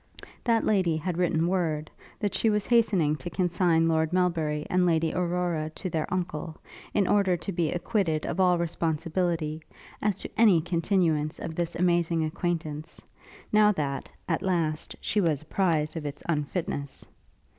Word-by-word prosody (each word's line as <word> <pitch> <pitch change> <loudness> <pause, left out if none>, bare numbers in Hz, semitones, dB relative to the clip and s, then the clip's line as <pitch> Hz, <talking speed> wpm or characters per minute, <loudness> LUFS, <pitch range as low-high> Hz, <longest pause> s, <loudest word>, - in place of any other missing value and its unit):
That 230 -2 +3
lady 185 -6 +2
had 175 +2 -3
written 170 -2 +2
word, 160 -5 -1 0.3
that 205 -3 -1
she 225 - +2
was 210 -1 +1
hastening 200 -11 +3
to 175 - -6
consign 175 -2 +2
Lord 160 -1 +1
Melbury 165 -5 0
and 185 0 +2
Lady 165 -2 +2
Aurora 175 -3 -1
to 185 - -5
their 160 -1 -2
uncle; 165 -3 -3 0.3
in 200 -3 +2
order 195 -3 +3
to 195 - -5
be 170 -4 0
acquitted 175 -4 0
of - - -3
all 180 -1 +4
responsibility, 165 -1 -1 0.4
as 210 -2 +1
to - - -6
any 210 -7 +6
continuance 165 -2 0
of 165 - -5
this 170 0 -2
amazing 170 -2 +2
acquaintance, 155 -1 -3 0.5
now 210 0 +6
that, 140 -5 -3 0.2
at 165 - 0
last, 165 -5 -1
she 210 - +1
was 155 -5 +1
apprized 155 -3 0
of 155 -3 -4
its 145 0 -7
unfitness. 150 -2 -3
170 Hz, 155 wpm, -27 LUFS, 155-185 Hz, 0.5 s, any